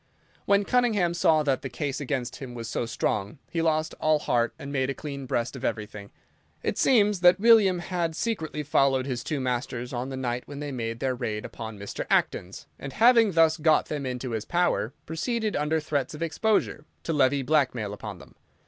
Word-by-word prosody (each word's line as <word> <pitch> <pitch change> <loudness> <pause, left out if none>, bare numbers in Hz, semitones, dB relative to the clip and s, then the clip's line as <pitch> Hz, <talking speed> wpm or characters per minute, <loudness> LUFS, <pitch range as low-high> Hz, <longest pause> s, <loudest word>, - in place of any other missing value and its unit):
When 200 0 +3
Cunningham 220 -9 +2
saw 160 -2 +3
that 135 -3 0
the 135 - -5
case 140 +4 -3
against 130 -3 -3
him 125 -3 -8
was 115 -1 -6
so 115 +1 -2
strong 105 +1 -2
he 165 - 0
lost 160 -1 +1
all 155 0 +4
heart 120 -5 +1
and 140 - -7
made 135 -1 0
a 135 - -2
clean 140 -3 -6
breast 120 +2 -1
of 130 - -8
everything. 105 -3 -4 0.5
It - - -1
seems 210 -6 +4
that 180 +1 +6
William 215 -4 +6
had 175 -2 -2
secretly 160 -8 -2
followed 135 -3 +2
his 125 -3 -3
two 150 - -2
masters 125 -1 -3
on 125 +2 -3
the 135 - -5
night 125 -1 -3
when 140 -1 -8
they 145 -1 -4
made 115 -2 -4
their 130 -1 +1
raid 110 -3 -4
upon 110 -2 -7
Mr. 100 0 -6
Acton's, 90 +2 0
and 135 - -7
having 230 -2 +5
thus 165 -1 +4
got 155 -1 +3
them 145 -3 -3
into 125 0 -4
his 110 -2 -2
power, 175 -9 0
proceeded, 220 +7 -2
under 150 +2 +1
threats 145 -2 -2
of 155 - -4
exposure, 165 0 0 0.2
to 165 - -2
levy 140 -1 +3
blackmail 125 -7 +1
upon 105 - -7
them. - - -15
140 Hz, 195 wpm, -26 LUFS, 125-165 Hz, 0.5 s, that